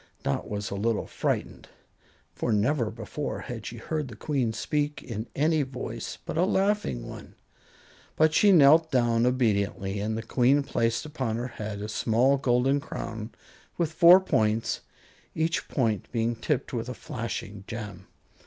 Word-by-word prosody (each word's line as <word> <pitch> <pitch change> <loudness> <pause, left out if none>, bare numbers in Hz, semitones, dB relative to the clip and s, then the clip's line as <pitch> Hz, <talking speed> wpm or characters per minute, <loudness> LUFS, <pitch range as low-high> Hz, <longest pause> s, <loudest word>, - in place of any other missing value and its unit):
Dot 70 - -2
was 105 -1 -4
a - - -2
little 110 +2 0
frightened, - - -3 0.6
for 120 - -2
never 115 +3 +2
before 115 +6 -5
had 115 -3 -6
she 120 - -7
heard 150 +5 -3
the 120 - -9
Queen 130 -1 -1
speak 145 +5 -2
in 110 0 -5
any 155 +2 +2
voice 125 -4 -5
but - - -3
a - - +4
laughing 190 - 0
one; - - -10 0.8
but 155 0 +4
she 205 +5 +5
knelt 160 -1 +6
down 120 -2 +3
obediently, 100 -5 0
and 110 +2 -2
the 115 - -4
Queen 130 +4 +3
placed 115 0 0
upon 130 -7 -3
her 120 +2 -3
head 105 -3 -6
a - - -4
small 120 +5 +2
golden 130 +1 +2
crown 110 -5 -6 0.5
with 165 -3 0
four 170 +3 +8
points, 110 - 0 0.5
each 160 +1 0
point 110 -7 -1
being 115 0 0
tipped 130 +4 -2
with 120 0 -3
a 125 - -5
flashing 105 -4 -5
gem. 105 -5 -7
120 Hz, 155 wpm, -27 LUFS, 110-145 Hz, 0.8 s, four